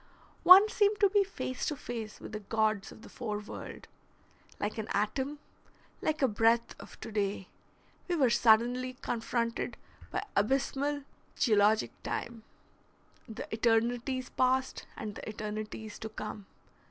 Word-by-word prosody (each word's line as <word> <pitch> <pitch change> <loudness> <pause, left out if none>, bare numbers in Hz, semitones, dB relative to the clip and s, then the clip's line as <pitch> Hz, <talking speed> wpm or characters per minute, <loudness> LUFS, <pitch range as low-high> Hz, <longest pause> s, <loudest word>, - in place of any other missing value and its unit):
One 380 +4 +10
seemed 420 -1 +2
to 400 -2 +5
be 410 -1 +5
face 255 -9 -4
to 300 - -1
face 230 -5 -6
with - - -9
the 215 - -4
gods 215 -1 0
of 220 - -14
the - - -11
fore 220 -5 -4
world. 210 0 -8 0.7
Like 210 +2 -2
an 215 - -4
atom, 260 +8 -1 0.6
like 310 -2 0
a - - +6
breath 230 +1 +2
of - - -12
to - - -6
day, 200 -2 -2 0.6
we 355 - 0
were 265 -7 +3
suddenly 245 +3 +3
confronted 235 -1 -2 0.3
by - - -2
abysmal 275 +6 +1 0.3
geologic 215 -2 +3
time, 235 -1 -4 0.9
the 220 - -6
eternities 240 +3 +1
past 260 +1 +1
and 215 -1 -5
the - - -7
eternities 215 0 -6
to 220 - -5
come. 210 -2 -7
230 Hz, 140 wpm, -31 LUFS, 215-265 Hz, 0.9 s, One